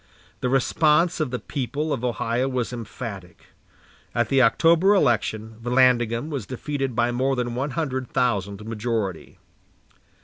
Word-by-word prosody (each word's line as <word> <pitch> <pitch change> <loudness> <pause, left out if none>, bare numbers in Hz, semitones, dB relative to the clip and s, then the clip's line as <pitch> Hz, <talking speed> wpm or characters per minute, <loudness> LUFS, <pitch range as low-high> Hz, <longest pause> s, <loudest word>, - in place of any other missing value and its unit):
The 125 - -1
response 155 +6 +2
of 155 -4 0
the 125 - -2
people 145 +5 -3
of 125 - -4
Ohio 120 +1 0
was 125 -2 -2
emphatic. 105 -6 -8 0.7
At 120 -1 +1
the 135 -1 +4
October 170 - +4
election 110 - 0
Vallandigham 120 +2 +2
was 135 -8 -4
defeated 135 0 -3
by 120 0 +2
more 130 +2 0
than 120 -1 -2
one 135 +4 -2
hundred 130 -5 -2
thousand 100 -4 -1
majority. 110 -3 -3
125 Hz, 135 wpm, -24 LUFS, 115-135 Hz, 0.7 s, the